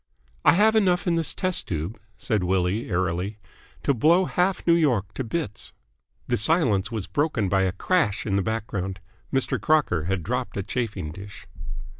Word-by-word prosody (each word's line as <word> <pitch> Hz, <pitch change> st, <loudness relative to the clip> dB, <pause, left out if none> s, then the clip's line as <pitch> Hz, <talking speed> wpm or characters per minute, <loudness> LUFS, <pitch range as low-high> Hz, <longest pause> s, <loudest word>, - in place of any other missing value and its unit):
"I -, -, +6 dB
have 215 Hz, +5 st, +4 dB
enough 185 Hz, -5 st, +3 dB
in 175 Hz, -, +2 dB
this 165 Hz, -2 st, 0 dB
test 185 Hz, -2 st, -1 dB
tube," 85 Hz, +6 st, -4 dB, 0.2 s
said 110 Hz, -4 st, -1 dB
Willie 95 Hz, +4 st, 0 dB
airily, 90 Hz, +2 st, -1 dB, 0.5 s
"to 140 Hz, -, +3 dB
blow 165 Hz, +9 st, +4 dB
half 180 Hz, +2 st, 0 dB
New 170 Hz, -, +5 dB
York 120 Hz, -, +2 dB
to 130 Hz, -, -3 dB
bits." 115 Hz, -, -4 dB, 0.5 s
The -, -, +1 dB
silence 115 Hz, -, +2 dB
was 110 Hz, -4 st, -3 dB
broken 145 Hz, -9 st, 0 dB
by 95 Hz, +1 st, +2 dB
a 95 Hz, -, +1 dB
crash 110 Hz, -, 0 dB
in 100 Hz, -, 0 dB
the 100 Hz, -, +2 dB
background. 100 Hz, -3 st, -3 dB, 0.3 s
Mr. 135 Hz, -1 st, 0 dB
Crocker 140 Hz, -, +2 dB
had 95 Hz, -1 st, -1 dB
dropped 125 Hz, +2 st, -3 dB
a 100 Hz, -, -1 dB
chafing 100 Hz, -9 st, -3 dB
dish. 100 Hz, +5 st, -10 dB
110 Hz, 170 wpm, -25 LUFS, 95-160 Hz, 0.5 s, I